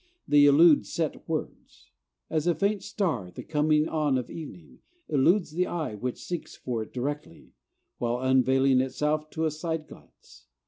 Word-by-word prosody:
They 145 0 +6
elude 145 -5 +6
set - - -3
words; - - -6 0.4
as 155 +1 -1
a 175 - +3
faint 200 +4 0
star, 180 - -2
at 90 - -16
the - - -7
coming 150 0 +2
on 150 -5 +1
of 125 - -5
evening, 95 - -10 0.3
eludes 165 +5 +2
the 180 +3 0
eye 160 -9 -3
which 120 +4 -5
seeks 175 -2 -5
for 120 -3 -4
it 110 - -8
directly, 130 - -5 0.5
while 120 0 0
unveiling 130 0 +3
itself 150 +4 -1
to 160 +1 -2
a 155 - +1
side 155 0 -4
glance. 60 +1 -17
150 Hz, 165 wpm, -27 LUFS, 130-160 Hz, 0.5 s, They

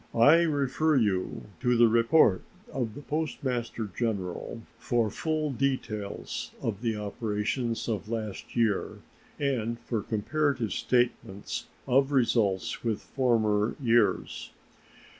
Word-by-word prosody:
I 145 +9 +7
refer 150 0 +1
you 100 -7 0 0.2
to 125 -1 +2
the 120 0 +7
report 115 -2 +4 0.3
of 120 -5 -2
the 145 - -9
Postmaster 125 -7 -2
General 110 0 -3 0.2
for 115 -3 +1
full 155 +3 -1
details 120 -6 -3
of 105 -2 -3
the 115 -2 0
operations 105 +3 -2
of 110 -3 -3
last 110 -3 -5
year 115 -4 0 0.4
and 120 -5 -1
for 115 -3 -2
comparative 125 +2 0
statements 120 -4 -1 0.2
of 135 +2 +3
results 115 -7 +1
with 115 -3 0
former 110 -5 +1
years. 120 -3 +1
115 Hz, 110 wpm, -28 LUFS, 110-135 Hz, 0.4 s, I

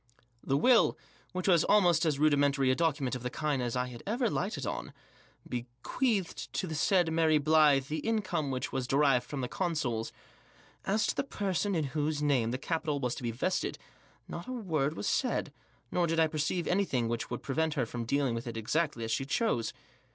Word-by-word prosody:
The 135 - +1
will 245 - +4 0.2
— - - -31
which 185 +1 -3
was 175 -4 +5
almost 175 -5 +4
as 150 -3 +1
rudimentary 140 -2 +3
a - - +2
document 145 -5 0
of 125 - -3
the 125 - -3
kind 145 -1 -1
as 120 -1 -2
I 125 -1 -3
ever 235 +2 0
lighted 175 - -2
on - - -4 0.3
— - - -24
be 120 0 -4 0.2
queathed 220 -9 -1
to - - -1
the 160 - -5
said 165 +1 +2
Mary 160 -1 +4
Blyth 150 -2 +4
the 155 +2 -2
income 185 -10 -1
which 130 -1 -3
was 130 -2 -2
derived 135 -3 +3
from 140 0 -4
the 125 - -2
consols. 130 -10 -2 0.7
As 215 +3 +1
to - - 0
the - - 0
person 200 -6 -1
in 160 - +1
whose 150 0 0
name 140 -6 +2
the 125 - -2
capital 155 0 -2
was 125 -2 -1
to - - -7
be 120 - -2
vested 135 +11 -1 0.5
not - - -7
a 255 - -4
word 160 - -1
was 100 - -4
said, - - 0 0.4
nor 175 -1 +1
did 165 0 0
I 160 - +6
perceive 155 +3 -1
anything 175 -11 +1
which 115 0 -3
would 120 - -5
prevent 155 +3 0
her 130 -5 +1
from 120 +1 -5
dealing 140 0 +1
with 115 +2 -4
it 115 - -5
exactly 140 +2 -1
as 115 - -3
she 135 - 0
chose. 145 - 0
150 Hz, 205 wpm, -31 LUFS, 130-175 Hz, 0.7 s, I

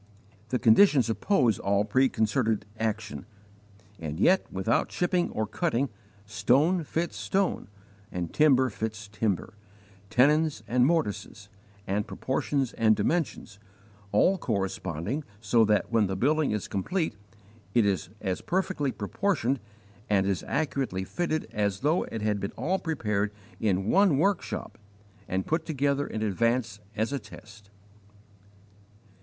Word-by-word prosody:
The 125 - +1
conditions 125 - +5
oppose 125 - +2
all 100 +1 +1
preconcerted 110 -2 +1
action, 110 -2 -3 0.7
and 80 0 -5
yet, 185 - +3
without 95 +5 0
chipping 175 0 0
or 110 - -2
cutting, 135 - -1 0.4
stone 140 - +2
fits 165 +3 -2
stone, 195 -1 -1 0.4
and 85 -2 -4
timber 130 -4 +4
fits 110 0 -5
timber 100 -4 -2 0.6
tenons 145 +1 +3
and 125 +1 +3
mortises, 110 - -2 0.4
and 100 +2 -1
proportions 135 0 -1
and 110 -1 +3
dimensions, 120 - -2 0.5
all 185 - +3
corresponding 100 - -2 0.2
so 115 +2 +3
that 105 +1 +1
when 110 -3 +3
the 95 - -2
building 145 +8 +2
is 105 -2 -2
complete 160 - -1 0.6
it 115 -3 +5
is 95 -5 0
as 95 -3 -2
perfectly 185 -6 -1
proportioned 135 - -1 0.5
and 100 -2 +3
as 95 -4 -1
accurately 135 -9 -1
fitted 155 - -2
as 100 -2 -1
though 155 +5 +2
it 110 -2 -5
had 105 -1 +1
been 100 - -4
all 175 +10 -1
prepared 105 - -1 0.3
in 95 -3 +1
one 190 - +4
workshop 195 +5 -1 0.5
and 95 +1 -1
put 160 +1 0
together 145 -2 0
in 110 - -3
advance 115 +1 0 0.2
as 110 +5 -1
a 140 - -1
test. 105 -1 -14
115 Hz, 125 wpm, -28 LUFS, 105-150 Hz, 0.7 s, conditions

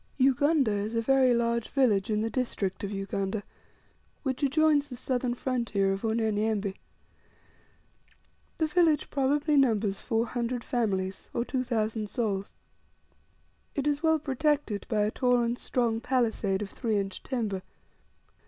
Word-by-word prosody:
Ugunda 275 0 +3
is 205 +2 -2
a 230 - +2
very 265 0 +4
large 235 -1 0
village 225 -9 +2
in 215 0 +1
the 225 - -1
district 215 -8 -2
of 200 - -2
Ugunda, 195 +1 -3 0.8
which 265 -3 -2
adjoins 290 +1 +3
the 250 - -6
southern 250 0 -1
frontier 235 -7 0
of 195 - -4
Unyanyembe. 220 -2 0 1.8
The 320 - +2
village 320 -1 +2
probably 290 +2 +2
numbers 220 -7 +2
four 230 -1 0
hundred 240 0 -3
families, 195 -6 -2
or 235 - 0
two 255 -1 -1
thousand 220 -3 -1
souls. 200 -4 -2 1.2
It 280 - -1
is 295 0 +1
well 320 -1 +4
protected 290 -6 -1
by 215 -3 +1
a 210 - 0
tall 250 -1 +2
and 235 +1 0
strong 235 -3 0
palisade 225 -6 0
of 200 - -8
three 225 -4 -1
inch 195 -1 -3
timber. 220 -7 -2
235 Hz, 140 wpm, -28 LUFS, 210-265 Hz, 1.8 s, very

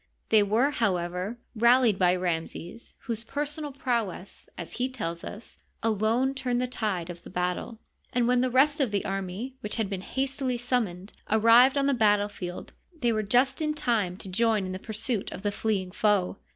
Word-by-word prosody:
They 220 -1 +6
were, 220 +8 +2
however, 185 -2 -1 0.2
rallied 235 -2 +4
by 180 -1 +4
Ramses, 175 +3 -3
whose 230 -3 -4
Cersonal 295 +4 -4
prowess, 230 -8 -3
as 175 - -7
he 250 +2 0
tells 170 -10 -4
us, 215 +3 -9 0.2
alone 225 +4 +2
turned 250 -2 -1
the 250 - +1
tide 200 -8 -2
of 175 - -11
attle; 180 +5 -3 0.3
and 240 -1 +1
when 250 0 +3
the 255 - +1
rest 285 +4 +4
of 270 -5 +2
the 200 -1 -1
army, 195 +7 -4
which 210 -5 -3
had 220 -4 -1
been 190 -2 -3
hastily 265 +2 -1
summoned, 225 -6 -2 0.2
arrived 230 +5 +6
on 275 - +2
the 280 - +3
battle 210 -3 +3
field 180 -3 -7 0.3
they 240 -2 +2
were 215 - +1
just 250 +7 +2
in 305 -1 0
time 215 -10 0
to 205 - -6
join 215 +1 +1
in 185 - -4
the 185 - -5
pursuit 220 0 -3
of - - -8
the 205 - +1
fleeing 200 -4 -1
foe. 205 -2 +1
220 Hz, 180 wpm, -27 LUFS, 190-250 Hz, 0.3 s, They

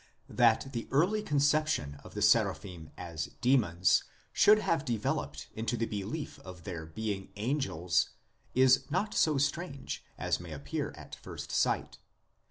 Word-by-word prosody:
That 120 +2 +3
the 115 -2 -4
early 180 +10 +2
conception 145 - +1
of - - -13
the - - -1
Seraphim 85 -5 +2
as 85 -3 -5
demons 110 -9 +3 0.3
should 210 +1 +7
have 165 -7 0
developed 75 - -2
into 115 +2 -2
the 115 - 0
belief 110 +10 -5
of 90 -2 -11
their 85 -4 -6
being 100 +3 -4
angels 105 - 0 0.5
is 130 +1 +5
not 190 +7 0
so 155 -3 +3
strange 140 0 -2
as - - 0
may 85 -2 -8
appear 70 -1 -3
at - - -12
first - - -8
sight. - - 0
115 Hz, 140 wpm, -31 LUFS, 90-145 Hz, 0.5 s, should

